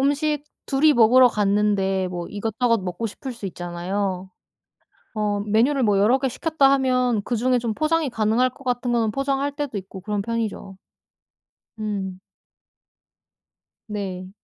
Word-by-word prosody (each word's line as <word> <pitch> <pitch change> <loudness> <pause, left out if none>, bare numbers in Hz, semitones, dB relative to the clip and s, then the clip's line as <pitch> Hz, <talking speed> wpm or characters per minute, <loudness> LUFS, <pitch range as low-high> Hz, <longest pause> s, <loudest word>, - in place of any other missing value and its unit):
음식 290 +1 +1 0.2
둘이 295 +3 +4
먹으러 245 +1 +6
갔는데 200 -3 +1
뭐 175 -1 -5
이것저것 225 +2 0
먹고 180 +5 -3
싶을 255 +5 -7
수 230 -4 -7
있잖아요. 185 +2 -3 0.8
어 210 -2 -1
메뉴를 230 +7 +2
뭐 205 -3 +3
여러 225 +6 +4
개 265 - 0
시켰다 290 0 +2
하면 255 -4 +1
그중에 250 +1 +1
좀 230 -2 -2
포장이 310 +2 +1
가능할 225 +2 +2
것 270 - -17
같은 245 -1 -1
거는 230 -3 +1
포장할 275 +2 -1
때도 285 -7 -3
있고 190 0 -8
그런 205 +1 -2
편이죠. 220 -3 -4 1.0
음. 195 -3 -4 1.7
네. 190 -3 -5
225 Hz, 275 characters per minute, -23 LUFS, 200-255 Hz, 1.7 s, 먹으러